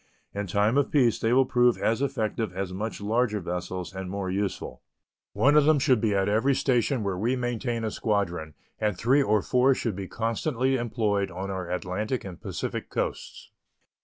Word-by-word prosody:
In 100 0 -3
time 105 +8 +2
of 140 - 0
peace 125 -6 +3
they 115 - +1
will 130 +2 +5
prove 125 -1 +3
as 115 +3 0
effective 115 -6 -1
as 95 0 -4
much 105 +3 -4
larger 110 +1 +1
vessels 90 0 -4
and 95 -1 -5
more 95 -1 -3
useful. 100 0 -3 0.5
One 145 +2 +4
of 150 -1 +6
them 155 0 +5
should 130 -5 +3
be 105 -3 +1
at 95 0 +1
every 115 +7 +2
station 125 -2 +1
where 95 -2 -2
we 120 +5 +1
maintain 120 -1 -2
a 110 - -1
squadron, 90 - -2 0.2
and 105 -4 0
three 130 +8 +3
or 105 -5 +2
four 130 +1 +3
should 115 -6 -2
be 95 0 -5
constantly 125 - -1
employed 110 -5 0
on 95 +2 -5
our 95 -2 -4
Atlantic 95 +7 -2
and 90 -3 -9
Pacific - - -4
coasts. - - -4
110 Hz, 185 wpm, -27 LUFS, 95-125 Hz, 0.5 s, of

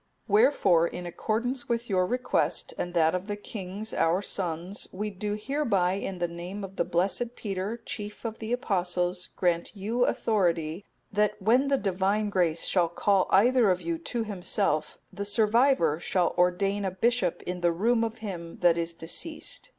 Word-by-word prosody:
"Wherefore, 205 - +4
in 180 +1 -7
accordance 235 +8 -2
with 235 0 -1
your 185 -3 +2
request, 250 +2 0
and 175 0 -4
that 160 -1 +4
of 185 +2 -3
the 205 - -2
kings 205 0 -6
our 175 +4 +2
sons,(261) 180 +1 -4
we 210 0 -2
do 205 +2 -3
hereby 210 -8 +1
in 195 0 -3
the 175 0 0
name 175 +4 -7
of 195 0 -8
the - - +2
blessed 200 +8 -1
Peter, 200 +2 -3
chief 210 +2 -6
of 225 -1 -4
the 220 +1 -5
Apostles, 180 -5 -1
grant 175 +2 0
you 225 +5 0
authority, 175 -4 0 0.3
that 210 0 +1
when 240 +7 +3
the 275 0 +3
Divine 200 +1 0
Grace 170 -4 +1
shall 175 -3 +2
call 195 +2 +2
either 240 +2 +5
of 180 -1 +2
you 170 -2 -3
to 230 +7 -2
Himself, 190 -5 -1 0.2
the 200 +1 -4
survivor 215 - +3
shall 180 0 +1
ordain 195 +3 +1
a 190 - 0
bishop 190 -1 0
in 180 0 -4
the 175 0 +3
room 225 +7 +2
of 225 0 -2
him 170 -4 -6
that 170 -1 +4
is 170 0 -2
deceased. 310 - -2
195 Hz, 170 wpm, -28 LUFS, 175-220 Hz, 0.3 s, either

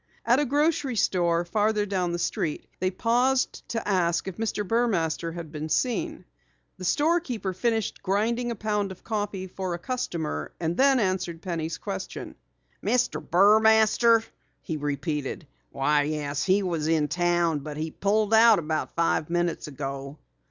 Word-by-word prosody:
At 240 +3 +4
a 295 - +2
grocery 285 -2 +1
store 175 -4 +1
farther 210 +2 +1
down 185 -3 -1
the 170 - -1
street 160 -2 -2
they 185 - +1
paused 245 +7 +1
to 230 - -3
ask 175 -4 +1
if 190 - -5
Mr. 215 -2 -2
Burmaster 175 -8 0
had 165 -3 -7
been 155 0 -5
seen. 310 - -1 0.5
The 185 - -6
store 320 - +3
keeper 230 - -4
finished 225 +3 -1
grinding 230 +5 0
a 235 - -2
pound 210 -2 -1
of 185 - -11
coffee 205 -3 -3
for 185 -1 -4
a - - -5
customer 170 - -3
and 165 0 -1
then 270 +2 +4
answered 185 -5 -1
Penny's 165 -3 -3
question. 95 - -6 0.5
"Mr. 245 +4 +1
Burmaster?" 220 +4 +5 0.4
he 160 - -3
repeated. 145 +1 -3 0.2
"Why, 145 +2 +2
yes, 145 -1 -2
he 195 +2 +3
was 165 -4 -1
in 160 -2 +2
town, 175 -2 +1
but 150 +1 -7
he 160 +1 -3
pulled 210 +4 +1
out 225 -1 +7
about 155 -2 -3
five 165 -2 +1
minutes 175 -2 -1
ago." 140 0 -6
185 Hz, 155 wpm, -26 LUFS, 160-225 Hz, 0.5 s, out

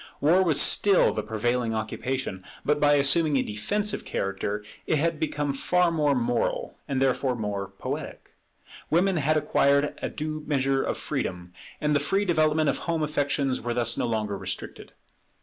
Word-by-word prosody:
War 165 +6 +4
was 165 -6 +3
still 200 -2 +4
the 110 - -2
prevailing 115 +2 -1
occupation; 110 -2 -3 0.2
but 150 0 +2
by 145 0 +4
assuming 145 +1 +3
a - - +2
defensive 205 - -2
character, 100 +2 -3 0.2
it - - +2
had 165 +1 0
become 145 -3 -1
far 180 +5 +2
more 150 -3 +2
moral, 120 -1 -1
and 135 -2 -1
therefore 130 -1 +1
more 105 -3 -3
poetic. - - -6 0.6
Woman 180 +3 +2
had 155 +1 +2
acquired 140 -1 +2
a - - -2
due 155 0 -5
measure 135 -2 +1
of - - -2
freedom; 90 0 -4 0.3
and 150 0 +1
the - - +4
free 195 +8 0
development 155 -3 +2
of - - 0
home 165 -2 0
affections 145 -3 0
were 120 0 -3
thus 120 -1 +1
no - - -1
longer 110 -3 -1
restricted. - - -5
140 Hz, 165 wpm, -26 LUFS, 120-155 Hz, 0.6 s, War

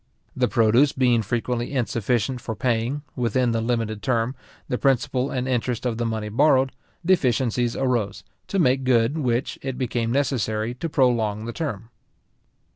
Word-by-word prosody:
The 125 -1 +2
produce 120 +5 +4
being 125 -3 +3
frequently 120 +3 -2
insufficient 125 -1 0
for 110 - -4
paying, 120 +5 -1
within 125 0 +1
the 115 0 0
limited 115 -2 -1
term, 115 +2 0 0.3
the 125 - -2
principal 135 0 +1
and 125 0 -2
interest 125 -1 -1
of 120 -2 -1
the 120 - 0
money 110 -1 -3
borrowed, 135 +2 +3 0.3
deficiencies 125 - +2
arose; 120 -7 -1 0.2
to 195 - -2
make 135 -6 +3
good 130 +3 +2
which, 125 -2 -1
it 135 -2 -4
became 120 -3 -1
necessary 120 -4 0
to 165 +7 -4
prolong 115 -7 +1
the 115 - -5
term. 115 - -4
120 Hz, 150 wpm, -24 LUFS, 115-130 Hz, 0.3 s, produce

